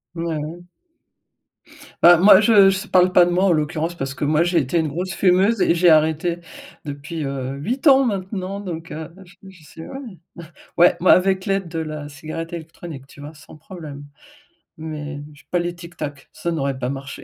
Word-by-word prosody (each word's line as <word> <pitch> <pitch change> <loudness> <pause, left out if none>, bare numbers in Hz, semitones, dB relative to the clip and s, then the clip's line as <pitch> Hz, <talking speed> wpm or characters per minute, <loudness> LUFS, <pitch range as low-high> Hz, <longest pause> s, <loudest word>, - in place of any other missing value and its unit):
Mouais. 165 0 -4 1.4
Bah 175 0 +8
moi, 190 +2 +7
je 205 -3 +6
je 195 +2 -2
parle 185 0 +4
pas 180 -1 +6
de 175 - -1
moi, 185 +2 +2
en 185 - +3
l'occurrence, 160 +2 -1
parce 135 -3 -4
que 145 - -3
moi, 155 +3 +2
j'ai 175 0 0
été 135 +5 -1
une 160 - 0
grosse 175 +5 -4
fumeuse 195 +4 +2
et 170 - +3
j'ai 175 0 +4
arrêté 160 +2 +2 0.5
depuis, 145 +2 -6
heu, 135 -1 -4
8 250 - -2
ans 270 0 +7
maintenant 195 -2 -4
donc 165 -4 -7
heu 160 +1 -7 0.2
je 175 - -19
je 180 -4 -17
sais, 160 +2 -12
ouais. 270 - -8 0.8
Ouais, 175 +1 +5
moi 180 - +6
avec 190 +1 +1
l'aide 195 -2 -1
de 165 -1 -5
la 155 -2 -5
cigarette 160 +3 -7
électronique, 160 -4 -9
tu 140 - -17
vois? 145 +2 -9
Sans 155 - -15
problème, 155 -4 -10 0.7
mais 150 -2 -6
je 145 -2 -19
pas 175 - +1
les 175 0 -3
Tic 170 0 -12
Tac, 145 -2 -7
ça 170 - -4
n'aurait 140 -4 -2
pas 125 - -2
marché. 135 0 -7
165 Hz, 190 wpm, -21 LUFS, 150-185 Hz, 1.4 s, Bah